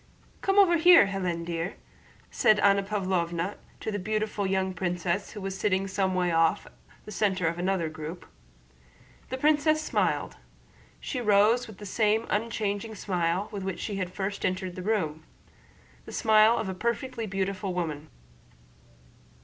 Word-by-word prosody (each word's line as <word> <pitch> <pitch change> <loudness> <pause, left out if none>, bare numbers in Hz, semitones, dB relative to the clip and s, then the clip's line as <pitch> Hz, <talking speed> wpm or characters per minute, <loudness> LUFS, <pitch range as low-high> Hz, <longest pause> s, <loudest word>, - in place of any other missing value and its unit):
"Come 390 0 +1
over 365 -4 +6
here, 345 - +8
Hélène, 180 -4 -3
dear," 170 +2 -3 0.6
said 215 -1 +4
Anna 200 0 +4
Pávlovna 185 -3 -2 0.2
to 220 - -3
the 205 - -2
beautiful 215 0 -2
young 190 0 0
princess 180 +2 -2
who 210 - -7
was 195 0 -4
sitting 195 -1 0
some 190 -1 0
way 180 -1 +1
off, 165 +4 +2 0.4
the 210 - -9
center 190 -3 0
of 170 +1 -2
another 180 -2 0
group. 155 +2 -7 1.0
The 260 - -3
princess 305 +2 +3
smiled. 310 - -1 0.6
She 255 - -4
rose 215 +3 +3
with 215 -3 -12
the 205 - -9
same 215 +2 +1
unchanging 215 -1 -2
smile 180 0 -1
with 200 - -5
which 190 -1 -4
she 205 -3 -4
had 185 -2 -3
first 200 +2 -4
entered 185 -1 -2
the 185 - -6
room—the 160 -7 -6
smile 220 +1 +4
of 220 - -2
a 190 - -3
perfectly 235 +3 -3
beautiful 195 0 -2
woman. 155 -4 -4
195 Hz, 150 wpm, -27 LUFS, 180-215 Hz, 1.0 s, here